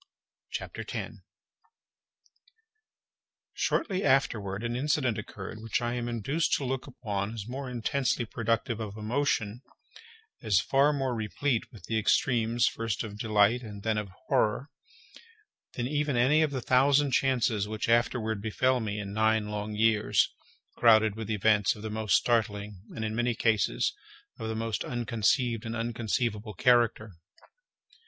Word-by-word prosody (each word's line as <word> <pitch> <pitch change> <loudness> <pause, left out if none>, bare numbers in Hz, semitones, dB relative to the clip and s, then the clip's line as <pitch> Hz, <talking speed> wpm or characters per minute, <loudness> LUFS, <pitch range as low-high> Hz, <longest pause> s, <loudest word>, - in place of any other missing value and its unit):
CHAPTER - - -5
10 - - -6 2.3
Shortly 195 - 0
afterward 110 -7 +1
an 120 0 -2
incident 130 -3 0
occurred 110 - -8
which 115 0 -1
I 120 0 -2
am 120 -1 -3
induced 135 +8 -1
to - - +1
look 130 +1 -3
upon 105 -5 -4
as 105 -2 -6
more 130 +2 -5
intensely 125 +1 -1
productive 115 +1 -1
of 110 -1 -6
emotion, 115 -1 -1 0.8
as 100 -4 +3
far 135 +8 +3
more 135 -3 -1
replete 115 +3 -1
with 110 - -14
the 110 -1 0
extremes 115 +1 +2
first 115 0 -1
of 105 -2 -8
delight 110 +2 +3
and 105 -4 -9
then 110 -1 +1
of 105 -2 -6 0.2
horror, 120 +7 +1 1.0
than 120 - -3
even 145 -2 0
any 140 +6 +4
of 155 - +3
the 135 -2 -3
thousand 140 +3 +3
chances 120 -6 +1
which 110 0 -3
afterward 115 -2 +1
befell 130 +4 +1
me 105 -2 -3
in 100 -1 -5
nine 110 0 +2
long 105 0 -4
years, 105 -2 +2 0.4
crowded 110 -2 +5
with 110 -1 -6
events 105 -1 +3
of 105 - -11
the 110 - -4
most 110 -2 +1
startling 105 -4 0
and, 110 - -3
in 110 - -2
many 120 0 0
cases, 105 - +1 0.5
of 110 - -4
the 110 - -2
most 110 -1 -2
unconceived 115 0 0
and 115 0 -4
unconceivable 115 -2 -2
character. 120 -2 +3
115 Hz, 145 wpm, -29 LUFS, 105-125 Hz, 2.3 s, crowded